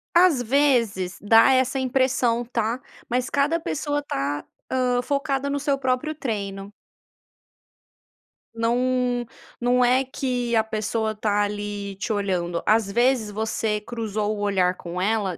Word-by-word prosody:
às 345 -7 +5
vezes 230 -8 +1
dá 225 +5 +6
essa 260 +1 +2
impressão, 255 -2 +1
tá, 230 +1 -2 0.3
mas 250 +1 0
cada 290 +4 +1
pessoa 290 -2 -2
está, 145 - -3 0.3
hã, 250 -1 +1
focada 280 0 -1
no 285 0 -1
seu 280 0 0
próprio 265 +4 -1
treino. 200 -6 -4 1.8
Não 245 +1 +1 0.3
não 245 +1 +3
é 255 +2 +4
que 250 -3 -2
a 220 - +4
pessoa 220 0 -2
tá 210 -1 0
ali 205 -1 -4
te 215 - -2
olhando, 180 -4 -1
às 215 -1 +3
vezes 240 0 +2
você 215 0 -2
cruzou 215 -2 -3
o - - -6
olhar 190 -3 +1
com 175 +1 -5
ela 200 -4 0
235 Hz, 135 wpm, -24 LUFS, 205-260 Hz, 1.8 s, dá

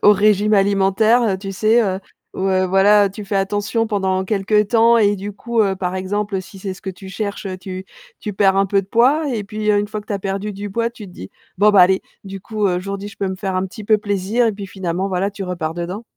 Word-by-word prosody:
au 205 - +8
régime 210 +1 +3
alimentaire, 200 +4 +3
heu, 205 -5 +1
tu 195 0 -6
sais? 220 +4 +3
Heu, 190 -3 -1 0.4
ouais, 190 0 +1
voilà. 200 +2 +4
Tu 210 +2 -8
fais 200 - -1
attention 205 +3 0
pendant 190 -3 0
quelque 210 +1 +2
temps 230 +2 +4
et 205 -3 +3
du 205 +1 -6
coup, 230 +3 -2
heu, 195 -3 +2
par 185 -1 -3
exemple, 195 +1 -2
si 185 +2 -13
c'est 190 0 -4
ce 185 - -12
que - - -7
tu 190 +1 -8
cherches, 200 +1 -4
heu, 185 -1 -5
tu 185 0 -7 0.3
tu 210 - -5
perds 195 -1 +3
un 195 - +4
peu 195 0 +2
de 190 - -13
poids 265 +9 +3
et 220 -5 -2
puis, 215 +1 -4
une 205 0 +2
fois 215 0 -4
que 210 - -18
tu - - -4
as - - -2
perdu 195 +2 -3
du 205 +1 -6
poids, 230 +3 0
tu 235 -2 -11
te 180 - -13
dis: 95 - -9 0.3
«Bon, 205 +2 +5
bah, 205 -2 +6
allez, 190 +1 +4 0.2
du 195 0 -7
coup, 215 +1 -2
heu, 180 - +1
aujourd'hui, 195 +2 -5
je 205 - -13
peux 195 - -1
me 190 - -4
faire 190 -1 -3
un 185 +1 0
petit 215 +3 -10
peu 215 +1 +4
plaisir» 205 +3 0
et 225 - +1
puis 200 -1 -7
finalement, 185 -1 -3
voilà, 190 +1 -1
tu 200 -1 -6
repars 170 -3 -3
dedans. 175 +5 -5
200 Hz, 260 wpm, -19 LUFS, 190-210 Hz, 0.4 s, au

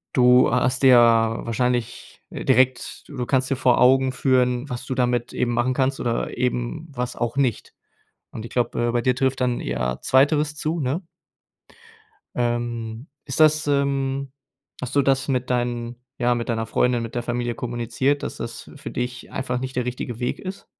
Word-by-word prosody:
du 125 0 +6
hast 125 +1 +1
dir 130 -2 +7
wahrscheinlich, 115 +1 +1
äh, - - -6
direkt 130 -1 +1
du 145 - -11
du 125 - -2
kannst 130 -1 +1
dir 135 - +1
vor 125 -1 +3
Augen 130 +1 +5
führen, 125 0 +1
was 125 0 -6
du 130 - -3
damit 120 -1 0
eben 120 -1 0
machen 120 +2 +1
kannst 135 0 0
oder 115 -1 -2
eben 125 +6 -2
was 125 -2 -4
auch 120 +2 -3
nicht. 130 -6 -1 0.6
Und 110 - -8
ich - - -8
glaube, 120 -1 0
äh, - - +2
bei 120 - +1
dir 125 +1 +2
trifft 130 0 0
dann 125 -1 0
eher 60 0 -2
2. 150 +3 +3
zu, 155 +3 -2
ne? 140 +8 -1 1.3
Ähm, 120 0 -2 0.2
ist 135 +1 -3
das, 155 -1 +4
ähm 140 -1 0 0.5
hast 125 +2 -5
du 140 - +5
das 135 0 +1
mit 125 -2 -1
deinen 120 -1 -1 0.3
ja, 120 0 +3
mit 120 0 -4
deiner 115 -1 -1
Freundin, 120 +1 +1
mit 115 +1 -7
der 120 - -1
Familie 120 -1 -2
kommuniziert, 125 +4 -1
dass - - -5
das - - -7
für - - -8
dich 125 0 -5
einfach 125 -2 -2
nicht 130 0 -5
der 125 - 0
richtige 125 -1 -5
Weg 125 - -2
ist? 190 0 -7
125 Hz, 180 wpm, -23 LUFS, 120-135 Hz, 1.3 s, dir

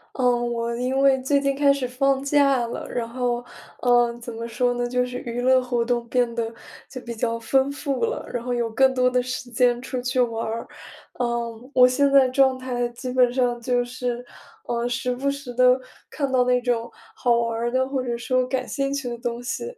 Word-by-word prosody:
嗯， 240 -2 +1
我 235 0 -2
因 255 +2 -1
为 270 -1 +4
最 280 +2 +2
近 275 -1 0
开 280 0 +4
始 275 -2 -1
放 270 +2 +1
假 275 -3 +3
了， - - -6
然 235 -2 -3
后， 245 0 -2 0.3
呃， 240 -1 +3
怎 235 0 -8
么 230 +1 -5
说 245 +2 0
呢， 245 0 -1
就 250 +1 0
是 250 0 -6
娱 240 0 -5
乐 255 +1 +4
活 245 -2 -1
动 240 -1 0
变 245 -1 +1
得 230 -1 -2 0.4
就 255 - -7
比 235 -1 -7
较 230 +1 -1
丰 265 +4 +1
富 280 - -3
了， 465 +2 -2
然 240 - -3
后 250 0 -2
有 235 -1 -1
更 265 +4 +4
多 250 -1 +3
的 250 0 +1
时 255 0 -5
间 245 0 +2
出 255 0 -4
去 250 +1 -1
玩 230 -2 0
儿。 225 +1 -4 0.5
嗯， 235 0 -3
我 250 -1 +7
现 275 +2 +2
在 275 -2 +6
状 260 0 +3
态 245 -2 -2
基 240 +2 -7
本 250 -1 +4
上 245 -2 0
就 245 0 +1
是， 245 0 -4 0.4
呃， 235 0 -2
时 250 +1 -1
不 275 +3 0
时 280 -3 -7
地 250 +1 +5 0.3
看 280 -2 -2
到 255 -1 +3
那 250 0 +2
种 235 -1 -1 0.2
好 245 - +2
玩 230 -1 -1
儿 235 +1 -1
的， 260 +1 +1
或 270 -1 -2
者 240 -1 -2
说 255 +1 0
感 255 0 -2
兴 275 0 -2
趣 275 -3 -3
的 240 - -5
东 240 0 -3
西， 245 - -4
250 Hz, 235 characters per minute, -23 LUFS, 240-260 Hz, 0.5 s, 我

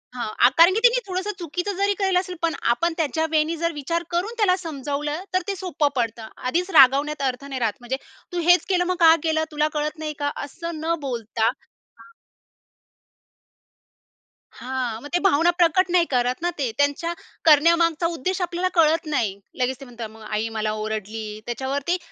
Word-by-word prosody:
हां, 240 0 +2
कारण 335 +3 +7
की 425 - +1
तिने - - +5
थोडंसं 375 +2 -2
चुकीचं 355 +4 -3
जरी 400 +1 +2
केलं 385 -2 +2
असेल, 365 -1 -5
पण 335 -1 +1 0.2
आपण 335 +7 -1
त्याच्या 320 0 0
वे 310 -1 +4
नी 325 +2 -3
जर 335 +1 0
विचार 335 +4 -2
करून 360 +6 -1
त्याला 395 -4 +3
समजावलं 295 -1 -4
तर 370 - +2
ते 400 - -1
सोपं 355 -5 -1
पडतं. 230 -2 -2
आधीच 345 +9 -1
रागवण्यात 280 +2 +5
अर्थ 255 +2 -7
नाही 270 -2 -5
राहत, 225 -3 0
म्हणजे 250 +2 -3 0.3
तू 355 - -2
हेच 355 0 +6
केलं, 360 -2 +2
मग 365 +1 0
का 325 -1 +7
केलं? 315 -1 +1
तुला 300 0 +1
कळत 300 0 -2
नाही 305 -1 -4
का? 285 0 0 0.2
असं 335 +3 -7
न 330 +1 0
बोलता 230 -4 -2
हां 260 - -9 2.4
हां. 250 -3 -4
मग 290 - -8
ते - - +3
भावना 345 -2 +4
प्रकट 350 +2 +4
नाही 345 -1 +5
करत 250 +2 +1
ना 350 - +2
ते. 260 -5 0
त्यांच्या 285 +4 0 0.3
करण्यामागचा 335 +2 +4
उद्देश 365 +6 -2
आपल्याला 355 +1 -1
कळत 325 0 +3
नाही. 205 -7 -1 0.2
लगेच 250 +1 0
ते 275 - -10
म्हणतात, 235 -3 -8
"मग 220 +1 -15
आई 215 +1 -1
मला 215 0 0
ओरडली", 215 0 -4 0.2
त्याच्यावर 265 +4 -3
ते 355 - +2
305 Hz, 180 wpm, -23 LUFS, 255-350 Hz, 2.4 s, कारण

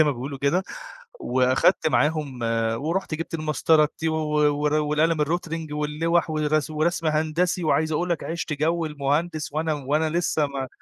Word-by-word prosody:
زي 155 - +7
ما 150 - +2
بيقولوا 135 +3 -6
كده، 140 +8 +1 0.6
وأخدت 130 +5 +2
معاهم 150 -5 0 0.4
ورُحت 170 +1 -2
جِبت 165 +2 -5
المسطرة 155 0 +3
الT 160 +2 -4
و 160 - -1 0.5
ور 150 0 +2
والقلم 155 +1 +2
الRotring 165 -1 -3
واللوَح 155 +3 0
والغسو 155 0 0
ورسم 165 +1 0
هندسي 160 +3 0
وعايز 155 0 +1
أقول 175 +4 -1
لك 170 - -1
عِشت 165 -1 -4
جو 160 +3 0
المهندس، 150 +2 -2
وأنا 155 +1 -1
وأنا 150 +3 0
لسّه 165 -2 +1
ما 135 -2 -5
155 Hz, 155 wpm, -24 LUFS, 150-165 Hz, 0.6 s, زي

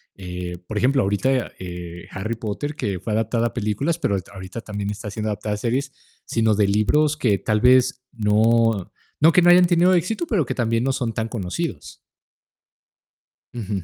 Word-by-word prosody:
eh. 90 -2 -6
Por 110 - -5
ejemplo, 130 +4 +3
ahorita 125 +6 0
eh, 85 -1 -8
Harry 110 +5 -3
Potter, 115 +7 -4
que 100 -3 -2
fue 110 - -4
adaptada 115 +2 +1
a - - -8
películas, 120 +8 -1
pero 140 -10 0
ahori 95 - -3
ahorita 95 +3 -7
también 105 -2 -4
está 105 0 -6
siendo 110 +1 -4
adaptada 105 +1 -3
a - - -5
series, 130 +5 -1 0.3
sino 110 -2 +1
de 105 0 +3
libros 145 +9 +2
que 110 -9 +2
tal 105 +3 0
vez 125 +2 +4
no, 110 -1 +2 0.3
no 160 +3 +6
que 180 - +5
no 175 - +5
hayan 180 0 +7
tenido 175 +1 +4
éxito, 185 - 0
pero 205 - +1
que - - -4
también, 115 0 0
no 135 - +1
son 125 -4 -2
tan 115 -1 -2
conocidos. 110 - -5 1.5
Ujú. 105 -5 -4
115 Hz, 180 wpm, -22 LUFS, 100-130 Hz, 1.5 s, hayan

